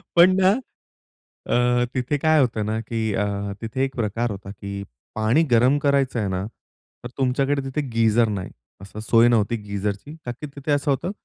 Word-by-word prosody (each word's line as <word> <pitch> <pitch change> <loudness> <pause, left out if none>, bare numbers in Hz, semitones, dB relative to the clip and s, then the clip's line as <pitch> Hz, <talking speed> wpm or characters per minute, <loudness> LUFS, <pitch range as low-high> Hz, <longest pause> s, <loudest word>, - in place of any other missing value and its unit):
पण 180 +2 +7
ना 185 - +6 1.0
अ, 125 0 +2
तिथे 130 +3 -1
काय 155 +2 +3
होतं 115 -4 0
ना? 110 +1 -1
की 110 -1 -2
अ, 100 -1 -2
तिथे 125 +4 -2
एक 135 - -7
प्रकार 115 0 -1
होता 100 0 -8
की 100 0 -7 0.3
पाणी 110 +9 +3
गरम 125 +5 +5
करायचं 140 -3 +1
आहे 105 - -1
ना 95 +1 -2
तर 120 +1 -15
तुमच्याकडे 135 +2 +1
तिथे 135 +3 -2
गीझर 115 0 +3
नाही. 95 -3 -4 0.3
असं 100 +2 -9
सोय 115 +2 +4
नव्हती 115 -1 +2
गीझरची. 100 +7 -4
ता 120 - -3
की 150 +5 -8
तिथे 145 +1 -3
असं 145 0 +1
होतं 170 +8 -1
120 Hz, 175 wpm, -23 LUFS, 105-135 Hz, 1.0 s, पण